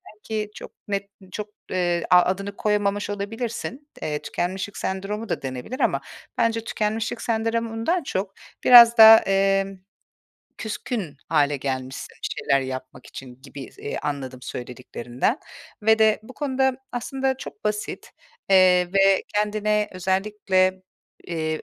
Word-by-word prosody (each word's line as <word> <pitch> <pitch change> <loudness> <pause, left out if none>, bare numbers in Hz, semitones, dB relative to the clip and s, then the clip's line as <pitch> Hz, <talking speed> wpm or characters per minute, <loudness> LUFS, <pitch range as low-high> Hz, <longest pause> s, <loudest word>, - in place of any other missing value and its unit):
belki 215 0 -4
çok - - -9 0.2
net, 200 -1 -3 0.2
çok, 210 +1 -5 0.2
eee, 175 -2 0
a 180 0 +8
adını 195 +3 -2
koyamamış 205 -1 0
olabilirsin. 230 +7 -5
Eee, 150 -1 -2
tükenmişlik 190 +3 -3
sendromu 200 +4 -4
da - - -2
denebilir 130 - -6
ama - - +1 0.4
bence 225 -1 +1
tükenmişlik 215 0 -2
sendromundan 230 +7 -1
çok 195 -5 -3 0.3
biraz 235 -1 +9
daha, 220 0 +11
emm, 195 0 +1 0.8
küskün 215 - -4
hâle 145 -2 +2
gelmişsin 130 -1 -5
bir - - -1
şeyler 140 -2 +2
yapmak 130 -1 -7
için 130 -1 -11
gibi 135 -1 -10
s - - -17
eee, 145 - -4
anladım 135 -3 -4
söylediklerinden 125 - -3 0.4
ve 220 +1 +4
de 220 -1 +4
bu 220 - -12
konuda 265 -2 0 0.2
aslında 265 +2 -2
çok 235 - -10
basit, 210 0 -3 0.4
eee, 180 -2 +5
ve 195 -1 +4
kendine 210 0 +1
özellikle, 190 0 0 0.4
eee, 160 -2 -3
200 Hz, 130 wpm, -24 LUFS, 170-220 Hz, 0.8 s, daha